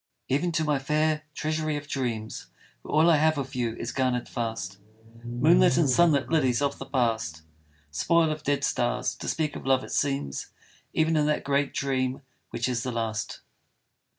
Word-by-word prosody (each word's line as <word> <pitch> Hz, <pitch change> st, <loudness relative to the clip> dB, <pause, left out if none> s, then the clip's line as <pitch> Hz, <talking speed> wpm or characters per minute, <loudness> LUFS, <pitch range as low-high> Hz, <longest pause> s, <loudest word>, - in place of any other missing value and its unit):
Even 160 Hz, +7 st, +1 dB
to 160 Hz, -, +1 dB
my 150 Hz, -2 st, +1 dB
fair 155 Hz, +2 st, 0 dB
treasury 155 Hz, -1 st, -1 dB
of 145 Hz, 0 st, -8 dB
dreams, 115 Hz, -6 st, -3 dB, 0.3 s
Where -, -, -9 dB
all 155 Hz, +2 st, +5 dB
I 160 Hz, -, +5 dB
have 155 Hz, +1 st, +3 dB
of 135 Hz, -2 st, -4 dB
you 120 Hz, -3 st, -1 dB
is 115 Hz, -, -4 dB
garnered 125 Hz, -2 st, 0 dB
fast, 110 Hz, -5 st, -4 dB, 0.4 s
Moonlit 125 Hz, +11 st, +4 dB
and 165 Hz, -4 st, +4 dB
sunlit 145 Hz, 0 st, +4 dB
lilies 130 Hz, -7 st, +2 dB
of 140 Hz, 0 st, -1 dB
the -, -, -7 dB
past 115 Hz, -, -1 dB, 0.5 s
Spoil 165 Hz, -, +2 dB
of 155 Hz, 0 st, -4 dB
dead 145 Hz, -1 st, 0 dB
stars, 125 Hz, 0 st, 0 dB
to -, -, -8 dB
speak 155 Hz, -2 st, -1 dB
of -, -, -7 dB
love 130 Hz, -1 st, +3 dB
it -, -, -9 dB
seems 135 Hz, -, -1 dB, 0.4 s
Even 160 Hz, +1 st, +2 dB
in 150 Hz, -1 st, +2 dB
that 150 Hz, -, 0 dB
great 140 Hz, 0 st, +1 dB
dream 130 Hz, -1 st, -1 dB, 0.3 s
which 120 Hz, -, -2 dB
is 125 Hz, -2 st, -1 dB
the 125 Hz, 0 st, -3 dB
last. 110 Hz, -3 st, -3 dB
135 Hz, 180 wpm, -27 LUFS, 120-155 Hz, 0.5 s, all